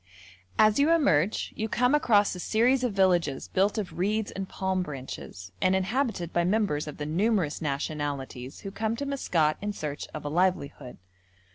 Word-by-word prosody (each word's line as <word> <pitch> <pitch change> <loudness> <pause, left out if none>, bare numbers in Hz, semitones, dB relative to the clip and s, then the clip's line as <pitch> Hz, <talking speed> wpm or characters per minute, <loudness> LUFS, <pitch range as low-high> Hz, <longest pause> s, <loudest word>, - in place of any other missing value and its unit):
As 215 +3 +5
you 290 +3 +4
emerge 210 - +2
you 220 +1 -3
come 250 +4 +2
across 215 -8 +4
a 180 - -7
series 245 +7 +2
of 250 - +1
villages 180 -8 +2
built 195 +3 +1
of 200 -5 -4
reeds 210 +3 0
and 195 0 -5
palm 190 -1 -1
branches, 130 - -7
and 185 0 +3
inhabited 195 - -1
by 175 - +2
members 185 -6 +1
of 150 - -7
the 150 - -4
numerous 180 0 0
nationalities 140 -3 -4
who 195 - -6
come 220 +2 -1
to 280 - -4
Maskat 170 - +1
in 205 0 -2
search 150 -6 -5
of 150 -1 -7
a - - -1
livelihood. 150 -6 -1
185 Hz, 170 wpm, -27 LUFS, 150-215 Hz, -, As